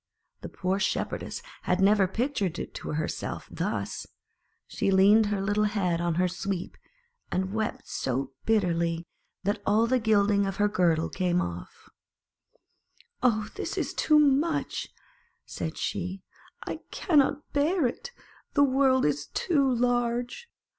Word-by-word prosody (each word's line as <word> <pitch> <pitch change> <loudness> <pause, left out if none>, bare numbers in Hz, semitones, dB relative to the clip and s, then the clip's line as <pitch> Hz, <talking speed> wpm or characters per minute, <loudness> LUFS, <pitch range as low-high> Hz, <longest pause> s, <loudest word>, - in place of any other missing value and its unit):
The - - -7
poor 190 +1 -1
Shepherdess 470 - -2 0.2
had 180 0 0
never 195 0 +4
pictured 200 - -1
it - - -6
to - - -5
herself 155 +1 -3
thus; - - -3 0.6
she - - -1
leaned 200 +3 +5
her 205 -1 -1
little 205 +2 +1
head 185 -5 0
on 170 -1 0
her 180 +2 +2
Sweep, 180 0 -4 0.6
and 190 +1 -1
wept 220 -1 -3
so 130 +2 -2
bitterly 170 -6 +1 0.4
that 205 +2 -1
all 215 +3 +3
the 255 +2 +2
gilding 205 -2 +3
of 195 - -3
her 205 +1 +2
girdle 170 -5 +2
came 180 -1 0
off. 85 - -6 1.3
"Oh, 220 -4 +2
this - - -4
is - - -1
too 305 - +3
much!" 295 +2 +2 0.6
said 160 - -5
she; 190 -1 -3 0.4
"I - - -4
cannot 295 -3 +1
bear 305 +3 +2
it. 240 - -3 0.5
The 285 - +6
world 265 -1 +3
is 145 0 0
too 280 - +1
large. 245 - 0
205 Hz, 135 wpm, -27 LUFS, 180-245 Hz, 1.3 s, The